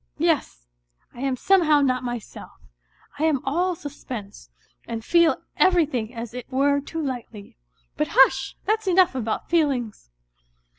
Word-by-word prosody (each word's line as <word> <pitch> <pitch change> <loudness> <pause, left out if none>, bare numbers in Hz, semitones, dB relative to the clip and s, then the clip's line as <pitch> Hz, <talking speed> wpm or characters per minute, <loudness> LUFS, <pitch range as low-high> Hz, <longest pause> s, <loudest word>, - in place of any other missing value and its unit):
Yes, - - 0 0.5
I - - -13
am 270 0 -1
somehow 310 -1 +3
not 255 -2 +1
myself; 240 -3 -7 0.7
I 310 - +2
am 305 -4 +2
all 350 +6 0
suspense, 245 - -9 0.4
and 225 -1 -5
feel 340 -2 +3
everything 300 -11 +2
as 230 0 -6
it 250 +1 -8
were 280 +2 +2
too 320 +3 -5
lightly. 235 -6 -7 0.4
But 150 - 0
hush! 265 0 +4
that's 435 -1 0
enough 370 -2 +4
about 230 -4 -3
feelings. 270 - -1
270 Hz, 135 wpm, -24 LUFS, 240-320 Hz, 0.7 s, hush